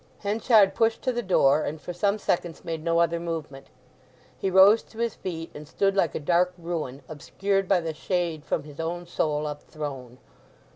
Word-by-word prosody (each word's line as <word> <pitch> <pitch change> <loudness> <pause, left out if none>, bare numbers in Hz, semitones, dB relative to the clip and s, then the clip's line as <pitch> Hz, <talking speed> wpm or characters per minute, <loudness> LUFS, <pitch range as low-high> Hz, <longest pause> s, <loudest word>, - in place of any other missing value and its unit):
Henchard 210 0 +4
pushed 225 0 +1
to 255 - +1
the 240 -1 -2
door, 155 -8 +3
and 155 +2 -4
for 175 - -7
some 200 +4 +1
seconds 175 -4 -2
made 165 -2 -4
no 165 0 +1
other 170 0 +2
movement. 155 -5 -6 0.7
He 195 - -2
rose 195 +4 +7
to 225 - -19
his 235 -1 -1
feet, 165 -3 -6
and 150 0 -10
stood 195 +4 0
like 175 -6 +1
a - - -1
dark 180 +4 +2
ruin, 165 -6 -5
obscured 195 +5 -2
by 185 -2 +3
"the 165 -1 -3
shade 170 -2 -2
from 155 - -2
his 150 0 -13
own 175 +2 -3
soul 155 -3 -1
up 150 -1 -5
thrown." 135 -5 -7
170 Hz, 190 wpm, -26 LUFS, 155-195 Hz, 0.7 s, rose